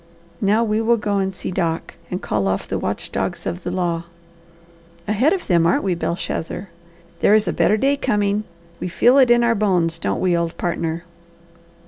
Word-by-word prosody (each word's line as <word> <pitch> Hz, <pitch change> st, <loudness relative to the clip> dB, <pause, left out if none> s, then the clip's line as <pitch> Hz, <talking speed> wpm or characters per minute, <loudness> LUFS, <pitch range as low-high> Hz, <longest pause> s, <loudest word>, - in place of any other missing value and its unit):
Now, 210 Hz, +3 st, +3 dB
we 215 Hz, 0 st, 0 dB
will 230 Hz, +1 st, +3 dB
go 205 Hz, -2 st, -1 dB
and 190 Hz, 0 st, 0 dB
see 190 Hz, -, -6 dB
Doc, 170 Hz, -3 st, -2 dB, 0.2 s
and 180 Hz, -, -4 dB
call 100 Hz, -2 st, 0 dB
off 95 Hz, 0 st, -1 dB
the -, -, -2 dB
watch -, -, -4 dB
dogs -, -, -3 dB
of 85 Hz, -, -3 dB
the 175 Hz, -, -4 dB
law. 175 Hz, -2 st, -1 dB, 1.0 s
Ahead 220 Hz, +9 st, +3 dB
of 385 Hz, -, -1 dB
them, 170 Hz, -3 st, +3 dB
aren't 170 Hz, -, +2 dB
we, 190 Hz, -2 st, +1 dB
Belshazzar? 175 Hz, +2 st, -3 dB, 0.5 s
There 210 Hz, -, +5 dB
is 215 Hz, 0 st, +2 dB
a -, -, 0 dB
better 210 Hz, -, +3 dB
day 275 Hz, +5 st, +2 dB
coming; 210 Hz, -5 st, 0 dB, 0.3 s
we -, -, -3 dB
feel 245 Hz, +9 st, +4 dB
it 255 Hz, -2 st, +5 dB
in 240 Hz, 0 st, +5 dB
our 235 Hz, 0 st, +3 dB
bones, 180 Hz, -6 st, +1 dB
don't -, -, -1 dB
we, 180 Hz, -2 st, +2 dB
old 170 Hz, 0 st, -2 dB
partner?" 170 Hz, -1 st, -2 dB
195 Hz, 190 wpm, -21 LUFS, 170-215 Hz, 1.0 s, There